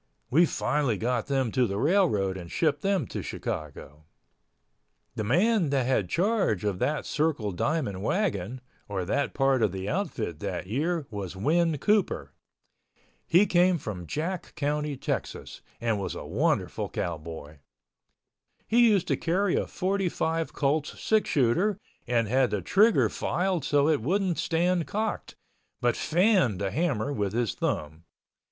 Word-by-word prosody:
We 165 +6 +5
finally 130 -6 0
got 120 +3 -1
them 135 -4 0
to 125 0 +2
the 100 - -3
railroad 135 - +2
and 90 -3 -8
shipped 150 -3 +1
them 195 +1 +1
to - - -5
Chicago. 75 0 -6 1.1
The 115 -3 -3
man 180 - +2
that 135 -3 +1
had 115 -8 +1
charge 195 - +1
of 100 -3 -1
that 150 +1 -1
Circle 145 -9 0
Diamond 125 - -1
wagon, 125 - -1 0.3
or 95 -3 -2
that 140 +9 -1
part 135 -2 +2
of 105 - +2
the 95 +1 -5
outfit 115 - -2
that - - -4
year 150 - -1
was 100 -3 -5
Win 160 - +1
Cooper. 210 +6 0 0.9
He 185 +5 +5
came 180 -1 +3
from 95 - -6
Jack 170 - -4
County, 150 -1 -1
Texas, - - -4 0.2
and 115 -3 0
was 100 - -4
a - - -7
wonderful 105 - 0
cowboy. 80 -3 -5 1.1
He 235 +1 +5
used 195 -4 +2
to - - +3
carry 180 +3 0
a - - 0
45 180 -4 -1
Colts 145 +1 -1
six 220 -1 +1
shooter 170 - +2 0.3
and 115 -2 +1
had 130 +2 +2
the 100 -4 -2
trigger 210 - +4
filed 180 -1 -1
so 145 0 +2
it 155 -6 +2
wouldn't 185 - 0
stand 170 0 +1
cocked, 215 +1 -3 0.4
but 120 -1 +1
fanned 175 - +2
the 100 -1 -1
hammer 145 - 0
with 100 -5 -2
his 115 -3 0
thumb. 80 +2 -3
140 Hz, 145 wpm, -27 LUFS, -, 1.1 s, We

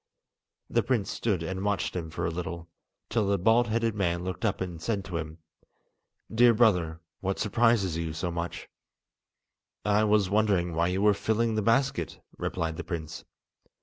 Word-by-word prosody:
The - - +2
prince 115 -7 0
stood 100 -8 -1
and 95 +3 -3
watched 100 -2 -1
him 85 -3 -3
for - - -3
a - - 0
little, 85 0 -5 0.4
till 110 -4 0
the 100 0 +2
bald 115 +5 +4
headed 115 0 0
man 85 -4 0
looked 90 -1 -5
up 110 -4 +1
and 90 -3 -5
said 100 0 -2
to 90 - -4
him: 80 0 -5 1.0
"Dear 120 +1 +6
brother, 90 -8 +2 0.2
what 95 0 -2
surprises 110 -5 +2
you 85 -1 -2
so 85 +3 -3
much?" 85 +1 -4 1.2
"I 105 +1 +3
was 105 -2 +3
wondering 100 -4 +2
why 85 +1 +2
you 95 +2 0
were 105 -1 +6
filling 110 +3 0
the 110 - +1
basket," 115 - +1 0.2
replied 80 -1 -3
the - - -4
prince. 80 -3 -6
95 Hz, 170 wpm, -28 LUFS, 85-110 Hz, 1.2 s, Dear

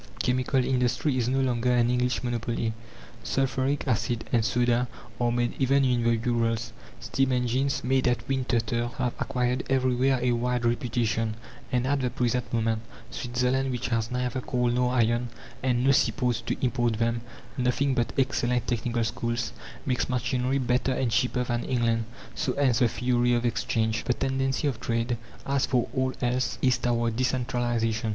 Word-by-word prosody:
Chemical 130 +1 +1
industry 125 +2 +1
is 120 -2 0
no 135 +1 +1
longer 125 -1 +1
an 120 -1 +3
English 125 0 0
monopoly; 115 -1 -1 0.5
sulphuric 135 +2 0
acid 120 -1 0
and 115 -2 +4
soda 120 +1 +2 0.3
are 120 -1 +2
made 120 0 0
even 135 +1 +3
in 125 -2 +2
the 115 0 +2
Urals. 115 -1 0 0.3
Steam 135 -1 0
engines, 125 +2 0
made 130 +1 +2
at 120 0 0
Winterthur, 120 -3 0
have 125 -2 0
acquired 125 -2 0
everywhere 130 0 +2
a 125 0 +1
wide 120 0 0
reputation, 115 -2 0 0.4
and 125 0 +1
at 140 +2 +1
the 125 - +1
present 125 0 -1
moment, 115 -1 0 0.3
Switzerland, 125 +1 0
which 125 -2 -2
has 115 -1 0
neither 125 0 -2
coal 125 -1 0
nor 125 0 +1
iron, 120 0 +2 0.3
and 125 -1 +1
no 135 - +5
sea 135 - +4
ports 125 -5 -1
to - - -3
import 120 -2 +1
them 115 +1 0 0.3
nothing 130 +2 +1
but 120 -2 0
excellent 125 -3 +1
technical 120 -1 -1
schools 115 +1 -2 0.3
makes 125 -1 0
machinery 125 +1 0
better 125 0 +1
and 125 -2 0
cheaper 125 +2 +1
than 120 -1 -2
England. 115 -3 +1 0.3
So 125 - -1
ends 130 -5 +2
the 120 - +5
theory 120 +1 +1
of 120 0 0
Exchange. 110 -1 0
The 125 - +1
tendency 135 +1 0
of 130 -5 -2
trade, 115 0 -1 0.3
as 140 -1 +1
for 125 -2 +1
all 130 0 +1
else, 125 +1 0
is 130 -2 +3
toward 115 -2 0
decentralization. 120 -3 0
125 Hz, 165 wpm, -27 LUFS, 120-130 Hz, 0.5 s, no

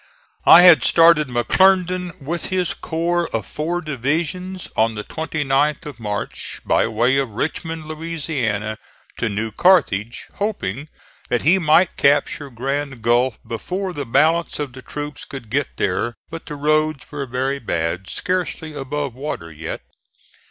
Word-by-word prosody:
I 175 - +10
had 175 -3 +8
started 165 -3 +5
McClernand 180 +7 +2
with 165 +4 -3
his 185 -2 0
corps 170 +1 -1
of - - -2
four 170 +4 -3
divisions 160 +6 -2
on 110 0 +2
the 105 - -4
29th 150 +1 -1
of 145 -5 -8
March, 105 -2 -5
by - - +3
way 120 +4 +2
of 135 -3 0
Richmond, 160 +7 -4
Louisiana, 145 -10 -3 0.4
to 115 - -1
New 110 +2 -3
Carthage, 120 - +2
hoping 155 - -3 0.4
that 120 - 0
he 175 +7 +5
might 170 +2 +3
capture 145 +1 +2
Grand 135 0 -3
Gulf 120 +1 +2
before 185 - -4
the 145 -5 -5
balance 160 +7 +2
of 145 -4 -4
the 130 - -10
troops 150 +2 -6
could 125 -6 -9
get 140 +1 -1
there; 105 +6 -1 0.2
but 165 0 -8
the 150 - -5
roads 155 0 +1
were 145 -2 -4
very 130 +3 -1
bad, 85 -3 -2
scarcely 180 -3 -2
above 140 -1 -3
water 125 - -5
yet. 80 +1 -6
145 Hz, 145 wpm, -21 LUFS, 120-165 Hz, 0.4 s, I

